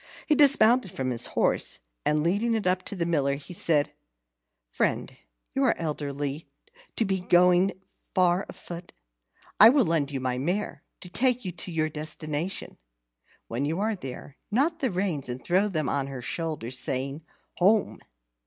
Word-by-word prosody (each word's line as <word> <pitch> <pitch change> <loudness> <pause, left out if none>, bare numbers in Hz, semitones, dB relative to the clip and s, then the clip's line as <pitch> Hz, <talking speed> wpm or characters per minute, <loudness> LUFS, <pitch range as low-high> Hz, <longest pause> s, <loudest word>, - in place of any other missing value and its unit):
He 305 - +3
dismounted 255 -6 +5
from 130 -5 -3
his 120 - +1
horse, - - +1 0.3
and 150 0 +2
leading 205 +7 +1
it 220 - -2
up 185 0 +2
to - - -4
the 170 -3 -1
Miller, 140 -5 +1
he 145 +5 -9
said: 155 -4 +2 0.7
"Friend, - - -1 0.4
you 270 - +1
are 255 - +2
elderly 145 -1 -4 0.5
to 225 - +1
be 190 -1 -1
going 180 +1 +4 0.4
far 180 +1 +3
afoot. 175 0 -9 0.7
I 220 - +10
will 265 0 +4
lend 160 -4 +1
you 140 -2 -3
my 125 -1 -2
mare 180 +9 -2 0.2
to 180 - -9
take 250 +4 +2
you 180 - -2
to 175 +1 -7
your 155 -1 0
destination. 155 +2 -4 0.7
When 120 +4 -3
you 160 +5 -1
are 215 +1 0
there, 135 -3 -9
knot 295 +9 +1
the 265 - +1
reins 180 -8 -2
and 125 +1 -5
throw 185 +4 +3
them 155 -8 -1
on 135 +1 -1
her 135 -3 -7
shoulder, 155 -4 -3
saying, 135 +3 -3 0.4
'Home!' 205 +4 +3
170 Hz, 165 wpm, -27 LUFS, 145-200 Hz, 0.7 s, I